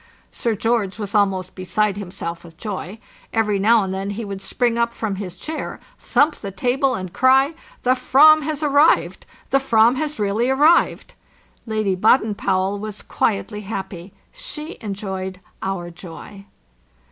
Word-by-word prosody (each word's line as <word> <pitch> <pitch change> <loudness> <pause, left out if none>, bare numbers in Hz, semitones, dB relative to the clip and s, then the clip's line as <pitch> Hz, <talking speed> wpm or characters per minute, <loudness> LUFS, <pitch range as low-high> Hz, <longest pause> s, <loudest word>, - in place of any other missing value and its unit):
Sir 230 -2 -1
George 225 -2 0
was 205 -2 -5
almost 195 -3 +1
beside 195 +2 0
himself 180 -4 -6
with 165 -2 -15
joy. 200 -1 -5 0.3
Every 210 -3 +1
now 220 +2 +4
and 190 -1 -3
then 195 +1 -3
he 210 +3 -4
would 195 -1 -6
spring 235 +4 0
up 235 0 0
from 210 -5 -3
his 185 -3 -6
chair, 315 - -5 0.2
thump 290 +5 +2
the 200 - -6
table, 250 +8 0
and 185 -2 -6
cry, 265 +4 +4 0.3
"The 250 - +4
fram 300 +5 +6
has 305 0 -3
arrived! 290 +2 +3 0.2
The 275 - +4
Fran 235 -1 +4
has 305 0 -2
really 210 +4 0
arrived!" 295 +6 +3 0.5
Lady 215 -3 0
Baden 215 +3 +3
Powell 195 0 0
was 210 0 -7
quietly 210 0 -1
happy; 190 -3 -6 0.2
she 365 -10 -7
enjoyed 190 -3 -5 0.2
our 180 -3 -3
joy. 185 +3 -11
210 Hz, 150 wpm, -21 LUFS, 190-250 Hz, 0.5 s, fram